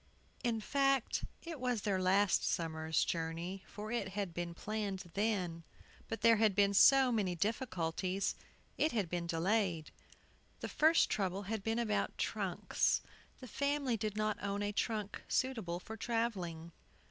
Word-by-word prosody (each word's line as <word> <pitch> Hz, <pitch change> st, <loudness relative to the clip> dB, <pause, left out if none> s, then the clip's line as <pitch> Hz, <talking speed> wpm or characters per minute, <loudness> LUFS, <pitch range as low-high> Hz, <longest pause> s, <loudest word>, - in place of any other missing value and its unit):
IN 235 Hz, -3 st, +1 dB
fact, 275 Hz, +2 st, +1 dB, 0.2 s
it 330 Hz, -3 st, -6 dB
was 250 Hz, -4 st, -1 dB
their 195 Hz, -3 st, +1 dB
last 190 Hz, +1 st, +3 dB
summer's 160 Hz, -1 st, 0 dB
journey 170 Hz, +3 st, -3 dB
for 215 Hz, +1 st, -7 dB
it 235 Hz, -5 st, -1 dB
had 195 Hz, -4 st, -2 dB
been 170 Hz, 0 st, -4 dB
planned 195 Hz, -3 st, -4 dB
then; 190 Hz, -6 st, -1 dB, 0.4 s
but 225 Hz, -1 st, -4 dB
there 230 Hz, -1 st, +6 dB
had 215 Hz, -3 st, +3 dB
been 200 Hz, 0 st, +4 dB
so 265 Hz, +5 st, +7 dB
many 200 Hz, -6 st, 0 dB
difficulties, 185 Hz, -, -1 dB, 0.5 s
it 315 Hz, -, +3 dB
had 210 Hz, -6 st, 0 dB
been 175 Hz, -1 st, -2 dB
delayed. 170 Hz, -1 st, 0 dB, 0.7 s
The -, -, -3 dB
first 320 Hz, +2 st, +4 dB
trouble 195 Hz, -1 st, -1 dB
had 215 Hz, +1 st, -3 dB
been 225 Hz, +3 st, -1 dB
about 225 Hz, -3 st, 0 dB
trunks. -, -, 0 dB, 0.4 s
The 255 Hz, -, -8 dB
family 280 Hz, -1 st, 0 dB
did 215 Hz, -1 st, -3 dB
not 215 Hz, -1 st, 0 dB
own 200 Hz, +1 st, -2 dB
a 205 Hz, -, -1 dB
trunk 210 Hz, -1 st, -2 dB
suitable 225 Hz, -10 st, -1 dB
for 220 Hz, +4 st, -8 dB
travelling. 195 Hz, -8 st, -2 dB
205 Hz, 145 wpm, -35 LUFS, 180-225 Hz, 0.7 s, so